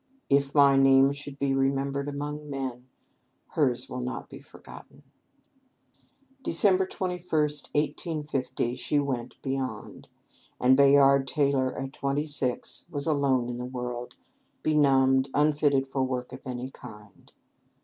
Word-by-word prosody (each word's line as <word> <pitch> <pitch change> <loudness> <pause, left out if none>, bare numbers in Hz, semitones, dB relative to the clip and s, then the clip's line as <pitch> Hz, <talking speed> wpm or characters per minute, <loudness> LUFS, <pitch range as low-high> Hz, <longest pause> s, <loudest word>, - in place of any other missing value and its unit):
If 140 0 +2
my 140 -1 +6
name 135 0 +5
should 145 -1 -8
be 140 -1 0
remembered 135 +1 0
among 145 +1 -5
men, 130 -3 -5 0.6
hers 130 -6 0
will 125 - -6
not 125 +1 -5
be - - -9
forgotten." - - -14 1.4
Dec. 190 -5 +2
21, 180 -1 -3
1850, 150 -4 -2
she 145 +3 -1
went 130 -4 -2
beyond; 135 -1 -5 0.5
and 130 +1 +5
Bayard 140 0 +5
Taylor 135 -2 0
at 135 +1 -5
twenty 140 +2 -1
six 140 -2 -3
was 145 -4 -3
alone 140 -5 +1
in 120 0 -4
the 125 - -5
world, 125 -1 -6 0.5
benumbed, 135 -3 +3
unfitted 145 -2 +2
for 135 0 -2
work 125 -1 -3
of 130 - -9
any 125 +1 -5
kind. 105 -4 -14
135 Hz, 125 wpm, -27 LUFS, 130-145 Hz, 1.4 s, my